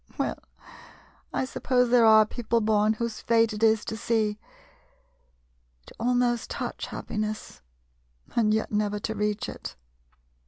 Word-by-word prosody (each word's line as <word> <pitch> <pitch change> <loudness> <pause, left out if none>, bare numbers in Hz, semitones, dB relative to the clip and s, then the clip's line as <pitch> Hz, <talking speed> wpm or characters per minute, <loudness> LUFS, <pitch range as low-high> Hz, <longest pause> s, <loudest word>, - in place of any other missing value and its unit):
" - - -25
Well, - - -2 0.9
I - - -1
suppose 250 -1 +1
there 240 -2 +6
are 220 0 +7
people 235 +1 -1
born 215 0 +2
whose 230 0 -4
fate 230 -1 +3
it 210 - -6
is 220 -1 +3
to 220 - -4
see, 220 -2 0 1.5
to - - -15
almost 245 0 +1
touch - - -4
happiness, 215 0 -5 0.7
and 220 -3 +3
yet 220 0 0
never 210 0 0
to 220 +2 -3
reach 210 -1 -1
it. - - -7
220 Hz, 135 wpm, -26 LUFS, 215-235 Hz, 1.5 s, are